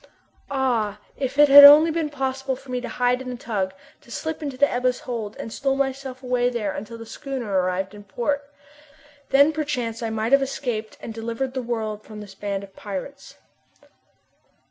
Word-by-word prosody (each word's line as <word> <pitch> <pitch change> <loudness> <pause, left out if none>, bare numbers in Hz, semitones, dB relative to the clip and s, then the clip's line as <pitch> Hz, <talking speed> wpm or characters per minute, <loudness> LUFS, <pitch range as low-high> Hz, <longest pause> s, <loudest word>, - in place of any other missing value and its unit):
Ah! 240 -7 0 0.2
if 270 0 -3
it 295 0 +7
had 285 +1 +11
only 300 +3 +10
been 320 -1 -1
possible 265 -1 -2
for 265 0 -12
me 250 0 -2
to - - -6
hide 250 +1 +1
in 260 - -6
the 250 - -4
tug, 210 -6 -2 0.3
to - - -21
slip 320 +6 -4
into 280 -4 -5
the 285 +2 +5
Ebba's 250 0 0
hold, 225 -4 -5
and 225 - -7
stow 270 -1 0
myself 270 -1 -3
away 250 -1 +1
there 225 -5 -2
until 215 +4 -7
the 230 - -9
schooner 240 -7 -3
arrived 185 +2 -1
in 205 0 -11
port! 280 +8 -3 0.8
Then 285 +3 +5
perchance 255 -7 -3
I 230 - -2
might 220 +1 -2
have 275 0 +6
escaped 245 -5 -3
and 225 - -7
delivered 230 +3 -4
the 260 - -2
world 220 -3 -3
from 215 -1 -10
this 205 -2 -10
band 200 0 -4
of 195 -1 -13
pirates. 205 +8 -7
250 Hz, 190 wpm, -23 LUFS, 220-275 Hz, 0.8 s, had